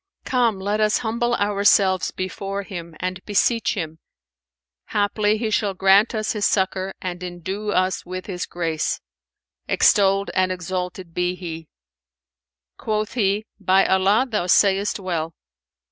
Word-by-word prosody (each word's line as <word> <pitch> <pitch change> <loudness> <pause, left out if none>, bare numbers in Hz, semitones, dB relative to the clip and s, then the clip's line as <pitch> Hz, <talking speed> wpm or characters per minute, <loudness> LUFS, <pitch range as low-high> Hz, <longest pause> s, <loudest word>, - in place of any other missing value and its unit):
Come, 235 -6 +1
let 205 +2 -1
us 215 0 +3
humble 240 +2 0
ourselves 200 -2 +3
before 195 +1 -4
Him 170 -4 -8
and 185 0 -4
beseech 225 +3 +1
Him: 160 -4 -5 0.9
haply 210 0 +1
He 220 0 -2
shall 205 -2 0
grant 195 +5 +4
us 215 0 -1
His 210 -2 -3
succour 190 -1 0
and 180 -1 -4
endue 180 +4 -5
us 185 -1 +1
with 185 0 -6
His 180 -3 -4
grace, 165 -3 -2 0.7
extolled 195 0 +3
and 185 0 +2
exalted 180 -1 -4
be 180 +1 0
He!" 165 -3 -7 1.1
Quoth 215 -1 -2
he, 210 -2 +1
"By 190 +1 +3
Allah, 195 +6 +3
thou 210 -7 -1
sayest 200 +2 +3
well!" 170 -4 -3
195 Hz, 130 wpm, -22 LUFS, 180-210 Hz, 1.1 s, grant